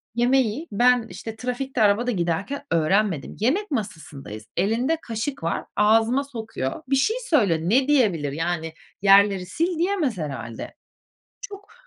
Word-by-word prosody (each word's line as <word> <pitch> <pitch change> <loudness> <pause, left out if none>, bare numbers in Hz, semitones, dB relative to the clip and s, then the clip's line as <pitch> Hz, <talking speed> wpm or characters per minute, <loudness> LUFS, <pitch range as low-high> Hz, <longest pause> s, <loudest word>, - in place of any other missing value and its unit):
ye 240 - +2
yemeği 260 +3 +1
ben, 245 +2 +3
işte, 225 -1 -7
trafikte, 250 +1 -3
arabada 215 +4 +3
giderken 185 +8 -2
öğrenmedim. 165 0 +1
Yemek 310 - 0
masasındayız, 145 - -6
elinde 240 +10 +1
kaşık 230 - -4
var, 165 - -2
ağzıma 225 +5 +3
sokuyor. 225 - -5
Bir 275 - +3
şey 435 - +1
söylüyor, 200 - +3
ne 245 - +2
diyebilir, 195 - +2
yani? 165 +1 -3 0.3
"Yerleri 195 -1 +5
sil." 340 +3 +1
diyemez 340 - 0
herhâlde, 135 -8 -6 0.7
çok 405 -4 -10
220 Hz, 130 wpm, -23 LUFS, 175-270 Hz, 0.7 s, Yerleri